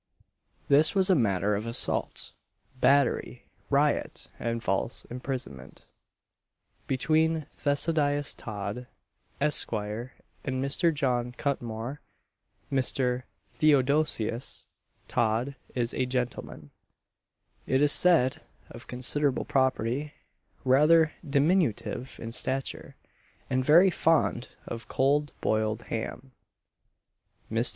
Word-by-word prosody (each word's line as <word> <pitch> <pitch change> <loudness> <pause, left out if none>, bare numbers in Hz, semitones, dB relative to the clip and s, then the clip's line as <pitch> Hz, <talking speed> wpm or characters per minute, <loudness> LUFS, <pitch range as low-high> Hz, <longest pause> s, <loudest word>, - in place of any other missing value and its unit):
This 150 +6 +5
was 190 0 +3
a - - +5
matter 105 - +1
of 105 +3 -2
assault, 115 +2 0 0.5
battery, 140 -1 +2 0.2
riot, - - 0
and 115 0 -2
false 95 +5 -1
imprisonment, 125 - -6 1.0
between 155 +3 +1
Theodosius 145 0 +1
Todd, 105 +3 -6 0.5
Esq. 150 +1 +2
and 110 +3 -3 0.4
Mr. 140 +5 +1
John 125 -5 -1
Cutmore. 125 0 -3 0.7
Mr. 130 -1 0 0.3
Theodosius 140 -4 +1 0.4
Todd 120 +5 0 0.2
is 120 -2 -1
a 130 - -1
gentleman, 125 - -4 1.0
it 130 - +2
is 145 0 +5
said, 160 -9 +4 0.3
of - - -11
considerable 135 +2 0
property; 130 0 0 0.5
rather 150 +5 +5
diminutive 140 - 0
in 115 - -6
stature, 130 +3 -4 0.6
and 130 0 +1
very 170 +7 +6
fond 160 -7 +1 0.2
of 115 -2 -7
cold 145 +1 +1
boiled 110 +1 0
ham. 120 +4 -5 1.2
Mr. 115 +2 +3
130 Hz, 95 wpm, -28 LUFS, 115-145 Hz, 1.2 s, very